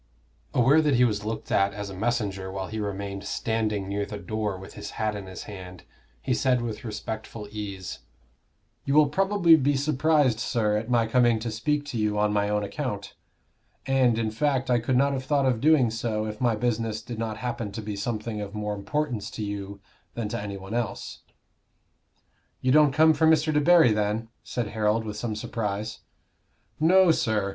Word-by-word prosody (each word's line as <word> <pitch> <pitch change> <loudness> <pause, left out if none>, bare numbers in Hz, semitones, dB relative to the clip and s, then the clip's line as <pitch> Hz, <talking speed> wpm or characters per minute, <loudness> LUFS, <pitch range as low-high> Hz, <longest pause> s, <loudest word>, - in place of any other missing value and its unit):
Aware 135 +6 +5
that 150 -3 +2
he 125 - +5
was 105 -4 0
looked 110 0 -4
at 100 0 +2
as 100 -1 -5
a - - -8
messenger 100 -3 -2
while 95 0 -4
he 110 - -4
remained 100 -1 -4
standing 110 -3 -1
near 100 +1 -1
the 105 0 -6
door 105 0 -3
with 95 +1 -11
his 105 -1 -7
hat 110 -2 0
in 100 -2 -7
his 95 - -8
hand, 90 -3 -10 0.4
he - - 0
said, 125 -1 +2
with 115 -3 -5
respectful 110 -1 -6
ease 100 -3 -6 0.8
"You 140 - 0
will 150 -2 +6
probably 190 0 +4
be 145 -1 +2
surprised, 145 -3 +2
sir, 110 -3 0
at 110 +2 -2
my 120 -2 +3
coming 120 0 +3
to 115 0 -3
speak 145 +7 -1
to 130 -6 -4
you 105 -1 0
on 105 0 +2
my 105 0 +1
own 105 0 0
account; 100 -2 -4 0.7
and, 130 -4 +3
in 110 -1 -1
fact, 135 +2 0
I 120 - +4
could 125 +2 +1
not 140 +2 +3
have 130 -1 -3
thought 140 0 +2
of 125 -4 +1
doing 145 -6 +4
so 110 -1 -2
if 105 +1 -6
my 120 -3 +3
business 115 -1 -1
did 115 -1 -7
not 110 -2 -3
happen 115 -2 -4
to 110 - -5
be 105 -1 -4
something 110 +1 -3
of 100 0 -6
more 105 0 -2
importance 120 +2 -2
to 110 - -5
you 100 -1 -5 0.4
than 115 -3 -2
to - - -3
any 100 -1 -5
one 95 +2 -8
else." 120 -4 -3 1.4
"You 130 - +1
don't 150 0 +6
come 160 +3 +5
from 160 +2 +3
Mr. 155 0 +3
Debarry, 150 -4 +5
then?" 105 +2 -1
said 120 -4 -3
Harold, 110 +1 +1
with 105 -1 -5
some 110 -1 -3
surprise. 105 0 -3 0.8
"No, 180 +3 +6
sir. 110 -9 0
110 Hz, 190 wpm, -26 LUFS, 105-130 Hz, 1.4 s, will